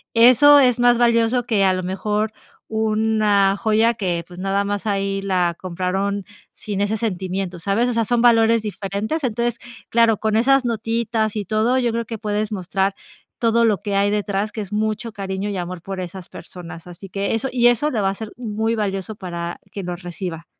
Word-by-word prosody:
eso 255 +5 +8
es 250 -3 +3
más 245 -1 +5
valioso, 235 +1 +3
que 220 -5 +1
a 190 -1 +4
lo 185 0 -2
mejor 210 +4 -1 0.3
una 215 -2 +2
joya 220 +1 +2
que 175 -5 -2
pues 180 0 -11
nada 195 +1 0
más 205 +1 -3
ahí 195 -1 -1
la 180 -3 0
compraron 190 +2 -2 0.3
sin 200 -2 -4
ese 210 +2 0
sentimiento, 190 -3 -3
¿sabes?, 200 +7 +1
o 245 - -1
sea, 230 -1 +1
son 240 +1 +1
valores 230 -1 +5
diferentes, 210 - -3
entonces, 235 0 -1 0.3
claro, 230 -2 +4
con 220 +1 0
esas 270 +3 +4
notitas 225 -1 -1
y 205 -2 -2
todo, 220 +5 +1
yo 245 -2 +1
creo 230 0 -2
que 225 +1 -6
puedes 210 0 -2
mostrar 195 0 -1 0.4
todo 230 0 +3
lo 210 -4 +2
que 205 -1 -3
hay 200 +1 +2
detrás, 205 0 -1
que 220 - -4
es 200 0 -8
mucho 215 +2 -2
cariño 195 0 -4
y 200 - -3
amor 175 -1 -5
por 195 0 -6
esas 180 0 -7
personas, 175 -1 -10
así 180 +2 -10
que 200 +3 -1
eso 260 +4 -2
y 240 -1 +4
eso 245 +5 +2
le 225 - -1
va 195 - +2
a 195 - -3
ser 220 +1 -7
muy 225 -1 -1
valioso 200 -1 -3
para 170 -3 -5
quien 195 -3 -6
lo 175 - -3
reciba. 175 -2 -6
210 Hz, 195 wpm, -21 LUFS, 195-230 Hz, 0.4 s, eso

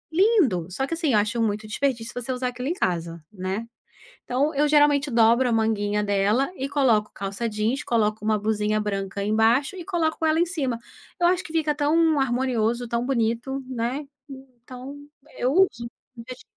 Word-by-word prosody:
lindo, 340 - +3
só 265 +9 -2
que 330 - -5
assim, 320 -6 0
eu 210 - +5
acho 230 +3 -1
muito 215 0 -1
desperdício 235 0 -2
você 245 +1 -4
usar 250 0 -2
aquilo 250 +2 -6
em 335 - 0
casa, 170 - -2
né. 190 +3 -4 0.6
Então, 275 +5 0
eu 295 +2 +2
geralmente 295 -1 +4
dobro 235 +2 +4
a - - 0
manguinha 210 -2 +1
dela, 205 - +1
e 270 +1 -3
coloco 235 -7 +2
calça 200 +4 -3
jeans, 220 +6 -1
coloco 215 -2 0
uma 215 0 +2
blusinha 215 0 0
branca 200 -1 -3
embaixo, 225 - +2
e 350 - -7
coloco 325 -4 -1
ela 315 +1 +2
em 350 - +3
cima. 270 -9 -2 0.4
Eu 345 - +4
acho 360 0 +1
que 320 - -10
fica 315 -2 +1
tão 310 +1 +2
harmonioso, 245 -2 0
tão 235 +1 -1
bonito, 250 +2 -1
né. 255 +4 -3 0.2
Então, 260 0 -11 0.4
eu 255 +2 +1
uso. 245 -10 +2 0.3
Em 230 - -8
vez 255 0 -9
de 230 - -16
245 Hz, 180 wpm, -24 LUFS, 215-285 Hz, 0.6 s, eu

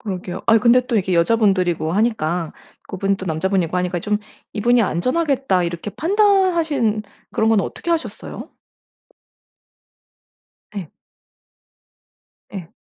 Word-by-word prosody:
그러게요. 185 -4 -5
아 225 0 +6
근데 245 +2 +4
또 240 -3 0
이게 190 -2 0
여자분들이고 175 -4 +2
하니까 180 -6 0 0.4
그분 195 +1 -1
또 190 - -8
남자분이고 180 +1 0
하니까 180 0 -1
좀 210 +3 -1 0.3
'이분이 235 +3 +3
안전하겠다.' 255 - 0
이렇게 170 +4 -4
판단하신 335 - +2 0.3
그런 220 - +1
건 220 -3 +4
어떻게 340 - -5
하셨어요? 330 -1 -4 2.2
네. 185 -6 -5 1.6
예. 180 -5 -7
205 Hz, 270 characters per minute, -20 LUFS, 180-245 Hz, 2.2 s, 아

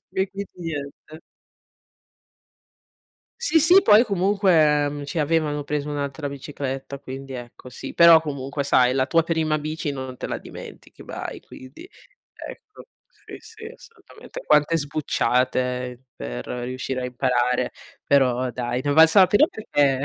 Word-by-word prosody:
E 190 +1 0
quindi 200 +1 -7
niente. 155 -1 -7 2.2
Sì, 325 -10 +3
sì, 360 +6 +6
poi 215 +2 +6
comunque, 180 -8 +2
mhmm, 145 0 -6
ci 155 +3 -3
avevano 150 -1 0
preso 150 0 -3
un'altra 145 0 -4
bicicletta, 140 -1 -6
quindi 135 0 -9
ecco 120 +1 -10
sì, 125 - -9
però 170 -1 +8
comunque 140 -2 -4
sai 130 -2 +3
la 130 -1 +1
tua 165 +2 +3
prima 160 -2 0
bici 155 -1 -4
non 130 -2 -7
te - - -6
la - - -4
dimentichi - - -12
mai, - - -7
quindi, 130 - -13 0.5
ecco, 425 - -12 0.2
sì, - - -13
sì, 445 0 -14
assolutamente. 460 +1 -13
Quante 150 +2 +3
sbucciate 125 -3 -1
per - - -7
riuscire 130 +1 -4
a - - -4
imparare, 125 0 0 0.3
però 130 -2 +2
dai, 120 0 -3
ne 145 - -1
è - - +2
valsa 160 +5 +6
la 185 - +7
pena 205 - +5
perché 140 - 0
145 Hz, 140 wpm, -23 LUFS, 130-165 Hz, 2.2 s, però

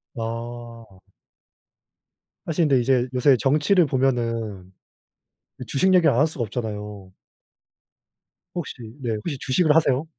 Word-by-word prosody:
아. 115 -3 -7 1.4
하 - - -3
근데 150 -5 +3
이제 125 0 +2
요새 130 +1 +4
정치를 155 - +3
보면은 115 -8 -1 1.0
주식 185 +7 +2
얘기를 165 -5 +5
안 115 - 0
할 150 - +5
수가 155 -6 -5
없잖아요. 105 -4 -6 1.4
혹시 175 -4 -5 0.3
네. 115 -3 -2
혹시 135 +7 -4
주식을 150 +4 +2
하세요? 150 -2 +2
125 Hz, 225 characters per minute, -23 LUFS, 115-150 Hz, 1.4 s, 얘기를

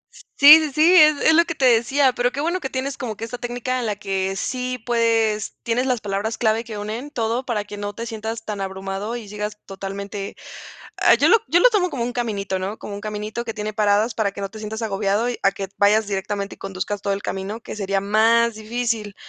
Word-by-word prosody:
Sí, - - -15 0.4
sí, 310 -2 -2
sí, 320 +5 +5
es 305 -4 +7
es 320 - +5
lo 335 +2 +6
que 335 - -4
te 275 - +1
decía. 255 +3 +4
Pero 245 0 0
qué 275 - -6
bueno, 340 +5 0
que 265 - -4
tienes 265 +1 -3
como 225 -5 -4
que 225 - -7
esta 245 +2 -7
técnica, 245 +1 -3
en 235 - -2
la 210 - -1
que 195 -1 -2
sí, 250 +4 -3
pues, 225 -3 +1
tienes 245 +3 0
las 250 -3 0
palabras 205 +2 -2
clave 220 0 +1
que 225 -2 -7
unen 220 +7 -5
todo, 235 -2 -1
para 220 -4 -1
que 205 - -9
no 205 0 -4
te 230 - -5
sientas 225 0 -5
tan 205 -2 -4
abrumado, 195 +3 -4
y 235 -3 -7
sigas 210 +1 -5
totalmente. 195 +1 -6 0.6
Ah, - - +5
yo - - +3
lo 460 - +7
yo 345 - +3
lo - - +6
tomo 400 -5 +2
como 265 -8 -4
un 245 +1 -2
caminito, 200 -6 -2
¿no?, 195 +4 -4
como 205 - -7
un 200 - -6
caminito 215 +2 -5
que 225 -2 -5
tiene 215 0 -4
paradas, 210 +2 +2
para 205 -3 0
que 200 - -8
no 195 - -3
te 220 - -10
sientas 215 +1 -6
agobiado, 205 +1 0 0.2
a 195 - +4
que 195 -1 -5
vayas 210 +1 +3
directamente, 200 0 -3
y - - -37
conduzcas 195 +1 -4
todo 200 0 -1
el 195 - -3
camino, 195 +4 -4
que - - -8
sería 195 -1 -1
más 225 +3 +3
difícil. 220 -2 -3
220 Hz, 235 wpm, -22 LUFS, 205-245 Hz, 0.6 s, es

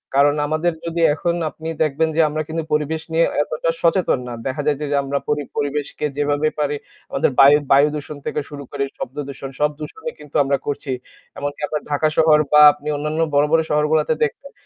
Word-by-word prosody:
কারণ 145 +1 +4
আমাদের 155 +3 +1
যদি 170 0 -2
এখন 170 +3 -1
আপনি 160 +2 -9 0.2
দেখবেন 155 +2 +1
যে 165 - +4
আমরা 155 +1 -2
কিন্তু 160 +1 -3
পরিবেশ 155 +1 0
নিয়ে 165 +1 +4 0.2
এতটা 155 +2 -2
সচেতন 170 -4 +2
না। 120 - -5
দেখা 130 +3 -2
যায় 150 -2 +2
যে, - - -1 0.2
আমরা 140 +1 -1
পরি 150 -1 0
পরিবেশকে 145 +1 -2
যেভাবে 145 +1 +1
পারি 145 0 0 0.4
আমাদের - - +1
বায় 140 +2 +8 0.2
বায়ু 140 +2 +6
দূষণ 150 0 -6
থেকে - - -2
শুরু 145 -1 -8
করে 140 -1 -2
শব্দ 130 - -6
দূষণ 135 -1 -7
সব 150 - +3
দূষণই 435 - -6
কিন্তু 150 - -14
আমরা 140 0 +1
করছি। 145 -1 -3 0.5
এমনকি 145 +1 -4
আপনার 150 - -3
ঢাকা 145 +2 +2
শহর 155 -1 +6
বা 150 - +7
আপনি 150 +1 -12
অন্যান্য 150 +2 -3
বড়, 145 +1 +4
বড়, 165 0 +5
শহরগুলোতে 150 +1 +2
দেখবেন 280 - -8
150 Hz, 190 wpm, -20 LUFS, 145-160 Hz, 0.5 s, বায়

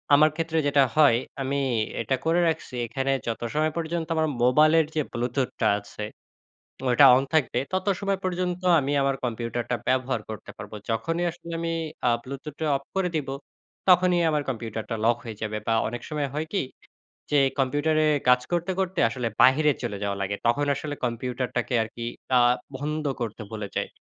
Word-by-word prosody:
আমার 155 +2 +6
ক্ষেত্রে 165 0 -2
যেটা 140 -1 +5
হয় 145 -7 +6 0.2
আমি 140 +1 -1 0.4
এটা 130 +4 0
করে 165 +2 +3
রাখছি। 160 -5 -2
এখানে 135 +3 -1 0.2
যত 115 - -2
সময় 155 0 +1
পর্যন্ত 165 0 -2
আমার 160 0 +2 0.2
মোবাইলের 155 +5 +5
যে 155 - +2
Bluetooth 125 +2 -1
টা - - +4
আছে, 105 +1 -9 0.8
তো - - -14
ঐটা 135 +3 +7
on 135 - +2
থাকবে, 130 -5 +2
তত 185 +1 -1
সময় 195 -1 0
পর্যন্ত 180 0 -2 0.2
আমি 140 +1 -2
আমার 135 0 +1
কম্পিউটারটা 120 +1 -2
ব্যবহার 130 -2 +1
করতে 110 - -8
পারবো। 105 +1 -8
যখনই 165 +10 -1
আসলে 170 0 -10
আমি 165 0 -1 0.4
আ - - +4
Bluetooth 140 +3 -7
টা 160 - 0
off 140 - -8
করে 185 -2 +2
দিবো, 135 -3 -2 0.5
তখনই 180 -1 +5
আমার 150 -1 +1
কম্পিউটারটা 115 -2 -4
লক 120 0 +4
হয়ে 110 -3 -7
যাবে। 105 0 -2
বা 115 - +2
অনেক 120 +1 -6
সময় 150 -2 -2
হয় 155 +2 -2
কি, - - +2 0.7
যে 145 - +4 0.2
কম্পিউটারে 150 +4 +2 0.2
কাজ 125 0 +6
করতে, 175 +2 0
করতে 185 -1 -1
আসলে 120 0 -2
বাহিরে 150 +3 +5
চলে 100 - -3
যাওয়া 100 -1 -1
লাগে, 100 +1 -2
তখন 145 +5 +3
আসলে 145 +1 -4
কম্পিউটারটাকে 125 +1 -2
আর 110 - -4
কি 115 0 -4 0.3
আ - - +5 0.4
বন্ধ 150 +2 -3 0.2
করতে 115 -1 -4
ভুলে 105 -2 -5
যাই। - - -1
140 Hz, 175 wpm, -26 LUFS, 120-160 Hz, 0.8 s, ঐটা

